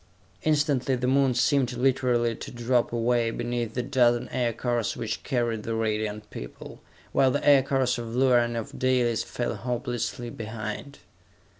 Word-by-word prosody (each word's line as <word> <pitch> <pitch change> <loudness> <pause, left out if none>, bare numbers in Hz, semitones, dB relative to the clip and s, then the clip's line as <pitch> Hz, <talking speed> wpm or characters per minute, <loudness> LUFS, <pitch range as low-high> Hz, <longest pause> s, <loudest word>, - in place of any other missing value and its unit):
Instantly 145 -4 +1
the 125 0 -2
Moon 135 -1 +3
seemed 130 0 +2
literally 125 -2 +1
to - - -8
drop 120 0 0
away 120 0 +1
beneath 120 0 -3
the 125 - -1
dozen 120 -3 +2
aircars 120 -2 -1
which 110 -1 -3
carried 120 -4 -1
the 115 +1 -3
Radiant 105 -1 -2
People, - - -9 0.3
while 135 - +4
the 145 +3 -1
aircars 135 -3 +4
of 115 0 -5
Luar 125 -1 +5
and 120 0 -3
of 115 - -6
Dalis 125 -3 +2
fell 120 - -3
hopelessly 120 -1 -3
behind. 110 +5 -6
120 Hz, 145 wpm, -26 LUFS, 115-130 Hz, 0.3 s, Luar